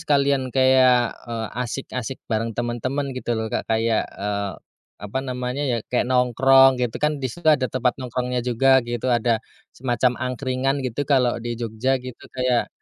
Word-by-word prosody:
sekalian 140 Hz, -2 st, +2 dB
kayak 130 Hz, -2 st, +4 dB, 0.2 s
eee, 115 Hz, -1 st, -3 dB
asyik-asyik 125 Hz, +1 st, -4 dB
bareng 115 Hz, 0 st, -2 dB
temen-temen 130 Hz, +4 st, -2 dB
gitu 125 Hz, -1 st, -5 dB
loh 110 Hz, 0 st, -2 dB
Kak -, -, -2 dB
kayak 110 Hz, 0 st, +1 dB
eee, 100 Hz, -1 st, -3 dB, 0.5 s
apa 105 Hz, +6 st, -3 dB
namanya 125 Hz, +1 st, -3 dB
ya 120 Hz, -, +1 dB, 0.2 s
kayak 125 Hz, 0 st, +1 dB
nongkrong 130 Hz, +1 st, +5 dB
gitu 120 Hz, -2 st, -1 dB
kan 150 Hz, -2 st, 0 dB
di 130 Hz, -, -1 dB
situ 175 Hz, +8 st, -11 dB
ada 130 Hz, -3 st, +1 dB
tempat 130 Hz, -1 st, +1 dB
nongkrongnya 125 Hz, 0 st, -2 dB
juga 130 Hz, +2 st, +4 dB
gitu. 120 Hz, +1 st, -3 dB
Ada 115 Hz, -1 st, +2 dB, 0.4 s
semacam 125 Hz, 0 st, +1 dB
angkringan 130 Hz, +1 st, -1 dB
gitu, 130 Hz, +4 st, -2 dB
kalo 125 Hz, -4 st, +3 dB
di 120 Hz, 0 st, -4 dB
Jogja 120 Hz, +3 st, -1 dB
gitu. 125 Hz, -1 st, -9 dB, 0.2 s
Kayak 125 Hz, -2 st, +1 dB
125 Hz, 160 wpm, -23 LUFS, 120-130 Hz, 0.5 s, nongkrong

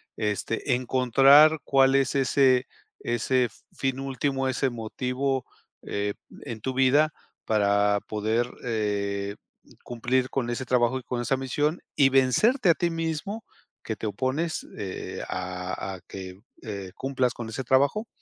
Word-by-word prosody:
este, 110 Hz, +4 st, -1 dB
encontrar 135 Hz, +5 st, +5 dB
cuál 135 Hz, -1 st, +4 dB
es 135 Hz, -1 st, +2 dB
ese 130 Hz, -1 st, +3 dB, 0.3 s
ese 120 Hz, +1 st, +1 dB, 0.2 s
fin 135 Hz, -1 st, -2 dB
último, 135 Hz, 0 st, -1 dB
ese 130 Hz, +1 st, 0 dB
motivo, 125 Hz, +3 st, -2 dB, 0.4 s
eh, 100 Hz, 0 st, -2 dB, 0.3 s
en 115 Hz, -5 st, -6 dB
tu 130 Hz, -, -2 dB
vida 140 Hz, +4 st, +3 dB, 0.3 s
para 100 Hz, -1 st, +2 dB
poder, 110 Hz, +3 st, 0 dB
eh, 100 Hz, -3 st, -2 dB, 0.5 s
cumplir 125 Hz, +2 st, -1 dB
con 125 Hz, -3 st, -2 dB
ese 120 Hz, +2 st, -2 dB
trabajo 125 Hz, 0 st, +2 dB
y -, -, -14 dB
con 120 Hz, 0 st, -3 dB
esa 130 Hz, +3 st, +1 dB
misión 145 Hz, +5 st, -1 dB
y 140 Hz, -, +5 dB
vencerte 175 Hz, -, +3 dB
a -, -, +8 dB
ti 175 Hz, -, 0 dB
mismo 165 Hz, +6 st, -3 dB, 0.4 s
que 110 Hz, -, -3 dB
te 110 Hz, -, -4 dB
opones, 130 Hz, -, -2 dB
eh, 95 Hz, -1 st, -5 dB
a 90 Hz, +1 st, -4 dB
a 90 Hz, -, -13 dB
que, 95 Hz, -1 st, -8 dB, 0.2 s
eh, 100 Hz, -5 st, -6 dB
cumplas 130 Hz, -2 st, 0 dB
con 115 Hz, -2 st, -7 dB
ese 120 Hz, +4 st, -4 dB
trabajo. 140 Hz, -, +2 dB
125 Hz, 140 wpm, -26 LUFS, 110-135 Hz, 0.5 s, a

